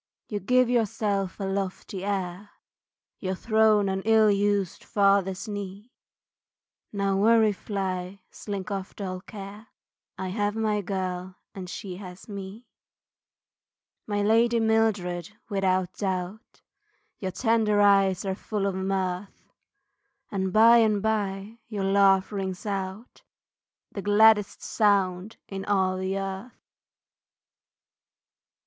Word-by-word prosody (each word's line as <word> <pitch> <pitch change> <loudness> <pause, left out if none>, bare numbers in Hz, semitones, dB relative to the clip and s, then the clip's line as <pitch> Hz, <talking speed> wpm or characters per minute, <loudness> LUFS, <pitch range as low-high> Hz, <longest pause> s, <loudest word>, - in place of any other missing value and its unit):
You 210 - -2
give 250 +5 +3
yourself 210 -5 0
a - - -3
lofty 195 0 -3
air, 195 0 -3 0.7
Your 190 -1 -2
throne 215 0 +3
an 190 0 -1
ill 220 -1 +5
used 200 -2 0
father's 195 -2 +1
knee 205 +2 -7 1.0
Now 200 -1 0
worry 220 +1 +5
fly, 190 -1 -4
slink 200 -1 -6
off 195 -1 -5
dull 185 -2 -5
care, 205 +2 -10 0.5
I 190 -1 -4
have 205 +2 -1
my 215 -2 0
girl, 185 -1 -4 0.2
and 185 -2 -7
she 185 -1 -6
has 185 -2 -10
me. 200 +3 -8 1.4
My 205 -1 0
lady 230 +2 +3
Mildred 210 -4 0
without 185 -2 0
doubt, 190 +2 -4 0.6
Your 190 - -3
tender 220 0 +1
eyes 195 -2 +4
are 190 - 0
full 205 +1 -3
of 200 - 0
mirth, 190 0 -3 0.8
And 190 -2 -1
by 230 +3 +7
and 215 -3 +3
by, 210 0 -2
your 210 -4 -4
laugh 195 0 +4
rings 190 -2 -4
out, 195 +2 -5 0.7
The 200 - -5
gladdest 210 0 +4
sound 200 -1 +1
in 195 -1 -5
all 190 -2 +1
the 190 +1 -2
earth. 195 +4 -7
200 Hz, 115 wpm, -26 LUFS, 190-210 Hz, 1.4 s, by